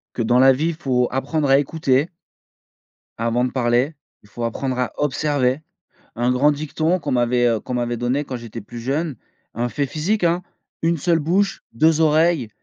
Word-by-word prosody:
que 120 - -1
dans 120 +2 +3
la 135 +1 +7
vie, 155 +6 0
faut 130 -6 0
apprendre 145 +3 -1
à 135 0 +6
écouter 145 0 +1 1.1
avant 115 +2 +1
de 125 - -1
parler. 125 +4 +1 0.3
Il 105 - -21
faut 120 +3 -6
apprendre 130 +2 -2
à 125 - -1
observer. 140 -1 0 0.5
Un 120 +2 0
grand 135 +4 +3
dicton 155 +4 -1
qu'on - - -3
m'avait, 120 0 +2
heu, 115 -2 0
qu'on 125 - -6
m'avait 120 -1 -1
donné 125 +5 -1
quand 130 - -5
j'étais 115 -2 -8
plus 120 +4 -9
jeune, 140 +4 -2 0.4
un 120 +1 -1
fait 140 +3 -2
physique 175 +8 -1
hein: 170 +1 +2 0.4
«1 165 +1 +2
seule 170 +2 +2
bouche, 185 +6 0
2 160 +7 +3
oreilles, 155 -4 +3
135 Hz, 180 wpm, -21 LUFS, 120-155 Hz, 1.1 s, la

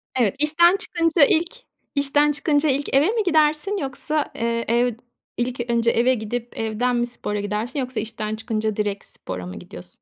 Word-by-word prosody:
Evet, 230 -6 +2
işten 340 +5 +4
çıkınca 335 -7 +2
ilk 340 - +1 0.4
işten 290 +1 +3
çıkınca 295 0 +1
ilk 275 +1 -1
eve 290 +6 +5
mi 440 0 +1
gidersin 315 +4 +2
yoksa, 290 +1 -2
eee, 230 0 -1
ev 240 +1 +2 0.4
ilk 240 0 -2
önce 235 0 +2
eve 245 +3 +3
gidip, 235 +1 -5
evden 225 +3 0
mi 240 0 0
spora 210 -3 -4
gidersin 210 +7 -3
yoksa 255 -2 -3
işten 215 0 -4
çıkınca 220 -2 -2
direkt 205 -1 -2
spora 90 -1 -7
mı 90 - -8
gidiyorsun? - - -12
245 Hz, 170 wpm, -22 LUFS, 225-300 Hz, 0.4 s, eve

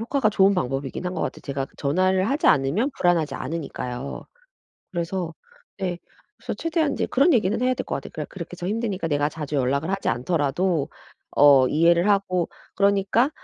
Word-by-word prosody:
효과가 235 0 +1
좋은 195 -1 +4
방법이긴 135 0 -3
한 180 - -3
것 - - -3
같아요. - - -4
제가 135 -1 -3
전화를 185 +7 +1
하지 285 +3 0
않으면 150 - +2
불안하지 170 -4 +1
않으니까요. 135 -3 -5 0.7
그래서 170 -1 -3 0.4
네 180 -3 -2 0.4
그래서 - - -5
최대한 320 -3 0
이제 - - -1
그런 280 +7 +3
얘기는 210 -1 +1
해야 255 0 +2
될 - - -4
것 - - -2
같아요. 135 - -8
그러 150 -2 -5
그렇게 180 -1 -8
저 175 - -5
힘드니까 205 -5 -2
내가 145 -1 +1
자주 150 -2 -5
연락을 140 +5 0
하지 195 0 -1
않더라도 150 +5 0 0.5
어 140 -2 +7
이해를 170 +4 +3
하고 185 -4 +1 0.3
그러니까 200 +6 +3
175 Hz, 400 characters per minute, -24 LUFS, 145-200 Hz, 0.7 s, 어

